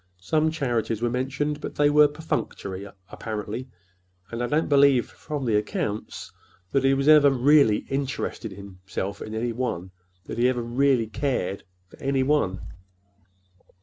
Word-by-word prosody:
Some 155 - +1
charities 120 -8 -1
were 120 - +1
mentioned, 135 +4 -2
but - - -6
they 145 0 +3
were 150 0 +7
perfunctory, 100 -10 -4 0.2
apparently, 110 +3 -5 0.6
and 115 +1 -4
I 120 - 0
don't 150 +4 +1
believe, 140 -3 +5
from 145 -3 -6
the 115 -3 +1
accounts, 105 0 -3 0.4
that 135 - +2
he 135 - +4
ever 140 +2 +6
really 135 -4 +4
interested 135 -5 -3
himself 95 0 -6
in 110 - -6
any 120 +2 -1
one—that 95 -5 -6
he 125 +1 +4
ever 125 -2 -1
really 125 0 +2
cared 110 -5 -2 0.2
for—any 135 +3 -1
one." 130 -10 +1
125 Hz, 135 wpm, -25 LUFS, 105-140 Hz, 0.6 s, were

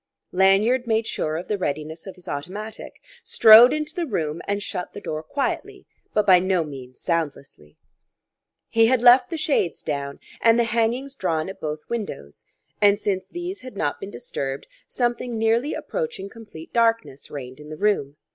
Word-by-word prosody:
Lanyard 200 +7 +3
made 225 0 +1
sure 155 -7 -2
of 175 - -6
the 210 -2 -2
readiness 155 +1 -4
of 190 - -8
his 180 - -19
automatic, 200 +10 -6 0.2
strode 225 - +8
into 305 0 -2
the 345 -2 -2
room, 160 - -2
and 200 0 -1
shut 180 -2 -5
the - - -7
door 155 -6 -4
quietly 275 - -3 0.3
but 210 -1 +1
by 185 -2 +7
no 185 -2 +1
means 130 -4 -10
soundlessly. 140 - -4 0.9
He 225 0 +4
had 250 0 +2
left 245 +1 +7
the 330 - -3
shades 295 - 0
down 140 -2 -4 0.2
and 230 0 +5
the - - +4
hangings 235 +4 0
drawn 165 -8 -1
at 190 0 -10
both 155 0 -4
windows; 195 - -6 0.4
and 205 0 +5
since 195 -3 -2
these 350 +2 -6
had 255 -5 -10
not 145 -6 -1
been 195 - -7
disturbed, 140 - -5 0.2
something 240 -1 -2
nearly 230 +6 +1
approaching 470 - -4
complete 210 -8 -12
darkness 230 - +1
reigned 130 -1 -8
in 150 0 -11
the 155 - -7
room. 150 -8 0
200 Hz, 170 wpm, -23 LUFS, 155-235 Hz, 0.9 s, strode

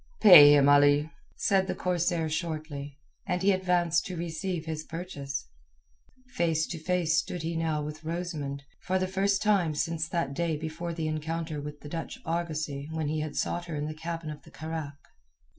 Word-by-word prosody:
"Pay 145 -8 +10
him, 140 -1 +5
Ali," 145 +2 +5 0.2
said 190 -1 +2
the - - -2
corsair 175 -2 0
shortly, 155 -3 -4 0.3
and 180 -1 -1
he 200 - +5
advanced 175 -3 +2
to 180 -2 -5
receive 170 0 -3
his 160 -1 -3
purchase. 155 - -5 0.9
Face 165 -6 +1
to 165 - -5
face 170 -1 +1
stood 175 -2 -4
he 165 +1 -2
now 160 -2 -1
with 150 +1 -7
Rosamund, 155 -4 -4 0.2
for 185 - -1
the 185 0 0
first 195 +1 +1
time 190 -7 +2
since 165 +1 -1
that 165 -6 -2
day 165 +1 -1
before 165 +2 -5
the 160 -2 -2
encounter 155 0 -3
with 150 0 -8
the - - -9
Dutch 165 +2 -5
argosy 155 -4 -3
when 160 -2 -2
he 155 0 -1
had 150 -1 -4
sought 175 0 -1
her 170 -3 -5
in 145 0 -2
the 155 - -4
cabin 165 0 -5
of 150 -1 -9
the - - -16
carack. 155 -2 -6
160 Hz, 180 wpm, -28 LUFS, 150-175 Hz, 0.9 s, Pay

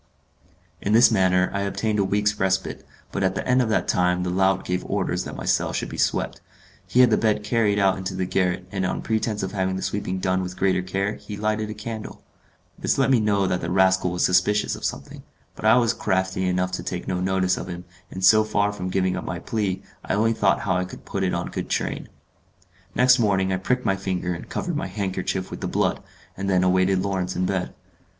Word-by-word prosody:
In 105 - 0
this 120 +2 +7
manner 95 -3 +3
I 100 - -1
obtained 105 +2 -1
a - - +3
week's 105 +2 0
respite, 95 0 -1 0.3
but - - -3
at 95 -1 +1
the - - -3
end 130 0 +4
of 120 - 0
that 110 - +1
time 90 0 +2
the 90 - -2
lout 95 +1 +2
gave 90 0 -1
orders - - -1
that - - -7
my - - -6
cell - - +1
should - - -2
be - - -7
swept. - - 0 0.5
He 120 +8 +4
had 125 -2 +6
the 110 - +3
bed 105 -1 +1
carried 105 -2 +1
out 95 -1 +2
into 95 0 -4
the 95 0 -1
garret, 90 0 0
and 95 -1 -2
on 95 - -2
pretence 110 -2 -1
of 95 - -3
having 95 -2 -1
the 95 - -4
sweeping 95 -2 -2
done 95 0 0
with 90 0 -6
greater 95 -1 +2
care, 95 +3 -2
he 105 - -8
lighted 110 0 -1
a 110 - -5
candle. 110 +1 -7 0.6
This - - 0
let 135 0 +3
me 125 - +5
know 100 -2 +2
that 90 -1 -1
the 85 - -3
rascal 95 0 +3
was 90 0 +1
suspicious 95 +3 +2
of - - -11
something; - - -4 0.3
but - - -7
I - - +7
was 120 -2 +3
crafty 95 -2 -1
enough 90 0 0
to 90 - -4
take 90 -1 -5
no 90 -1 -1
notice 95 0 +1
of - - -6
him, 90 0 -7 0.2
and 95 0 -2
so 110 +3 +7
far 105 -1 +1
from 95 -2 -4
giving 95 0 0
up - - -4
my - - -4
plen, 100 -4 -2 0.2
I - - -1
only 115 +2 +2
thought 105 -3 +2
how 95 -1 0
I 90 - -1
could 90 - -11
put 100 - -3
it 95 - 0
on - - -3
good - - -4
train. - - -2 0.9
Next 125 0 +5
morning 95 -4 +2
I - - +1
pricked 125 +7 -1
my 95 - +2
finger 95 -2 -2
and 85 - -8
covered 175 -4 -3
my 160 +4 -2
handkerchief 95 -2 -3
with - - -7
the - - -2
blood, - - 0 0.3
and 95 +1 -3
then 90 -1 +3
awaited 95 +1 +2
Lawrence 95 -2 -2
in 90 - 0
bed. 95 -1 -2
95 Hz, 230 wpm, -24 LUFS, 95-105 Hz, 0.9 s, this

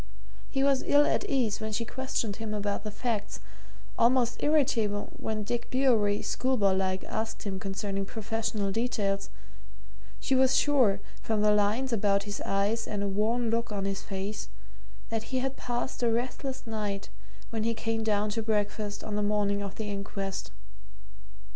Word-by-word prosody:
He 270 - +1
was 275 -1 +4
ill 290 +1 +6
at 405 - 0
ease 240 - +1
when 220 0 -3
she 230 +2 0
questioned 240 -4 -2
him 220 -1 -3
about 205 -1 -1
the 215 - -3
facts; 210 -1 -2 0.6
almost 240 0 +3
irritable 230 -9 +2
when 215 -1 -2
Dick 235 +3 -3
Bewery, 230 -6 +3
schoolboy 240 -7 +2
like, 190 0 0
asked 220 +1 -3
him 195 -2 -3
concerning 195 0 -2
professional 220 -2 -2
details; 200 -3 0 0.9
she 270 - 0
was 260 0 +5
sure, 245 -9 +4 0.2
from 220 -2 0
the 210 - +6
lines 210 +5 +2
about 200 -2 +2
his 205 0 -5
eyes 205 +4 +1
and 205 -1 -2
a - - 0
worn 220 +4 +1
look 230 0 0
on 200 -2 -2
his 195 -1 -2
face, 200 +1 -4 0.6
that 225 -1 -2
he 260 - 0
had 265 +1 -1
passed 240 0 -3
a 240 - +3
restless 260 +3 -2
night 210 -3 -3 0.4
when 225 -2 -1
he 230 0 +1
came 225 0 -1
down 210 -1 +1
to 225 - -1
breakfast 210 -1 -1
on 210 - -3
the 210 - +1
morning 205 -1 +1
of 200 -1 -5
the 220 - -4
inquest. 195 -1 -4
215 Hz, 165 wpm, -29 LUFS, 205-240 Hz, 0.9 s, ill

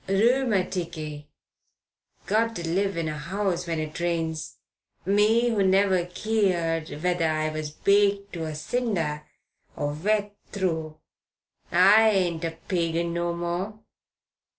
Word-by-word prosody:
Rheumaticky. 185 - 0 1.0
Got 225 +2 +1
to 170 -1 -4
live 195 +2 0
in 165 -1 -1
a 150 -1 -4
'ouse 185 -3 -1
when 165 -1 -1
it 155 +1 -5
rains 165 -6 -2 0.5
me 215 +5 +3
who 220 -4 +1
never 190 -2 +3
keered 175 -6 -1
whether 175 -2 +1
I 155 0 0
was 155 -1 -4
baked 200 +4 +2
to 165 -2 -4
a 155 -1 -5
cinder 160 -5 -2 0.5
or 145 0 -2
wet 205 +5 0 0.2
through! 160 -5 -2 0.7
I 200 +5 +6
ain't 180 -5 0
a 165 -1 -3
pagan 170 -1 0
no 170 0 -1
more. 175 +5 -3
175 Hz, 125 wpm, -26 LUFS, 160-200 Hz, 1.0 s, I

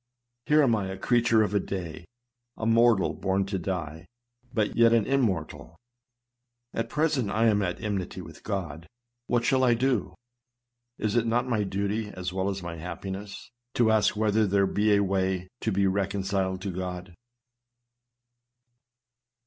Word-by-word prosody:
Here 150 0 +5
am 120 -5 +3
I, 100 -3 -2
a 95 0 -5
creature 115 +1 +3
of 105 - -2
a 100 - +3
day, 85 -4 -5 0.5
a 110 - -4
mortal 115 -2 +4
born 95 0 0
to 95 -1 -3
die, 80 -4 -4 0.4
but 110 -4 0
yet 115 0 +5
an 115 -3 +3
immortal! 85 - -1 1.0
At 115 - -2
present 150 -8 0
I 110 +3 +1
am 105 -2 +3
at 90 -2 -2
enmity 100 -4 -3
with - - -11
God. 85 -6 -4 0.4
What 120 -1 +1
shall 130 +1 +3
I 120 -2 +4
do? 125 -4 0 0.8
Is 105 0 -1
it 115 -1 +2
not 120 +2 +1
my 110 -4 +1
duty, 100 +2 -2
as 90 -2 -5
well 95 +1 -1
as 95 -2 -4
my 85 -1 -6
happiness, 95 +6 -7 0.2
to 115 -2 +4
ask 110 0 +3
whether 110 0 +2
there 100 0 +3
be 105 +2 +2
a 100 - +3
way 95 -1 0
to 110 - -1
be 100 0 +2
reconciled 95 -1 -1
to 100 - -2
God 90 0 -5
100 Hz, 155 wpm, -27 LUFS, 95-115 Hz, 1.0 s, Here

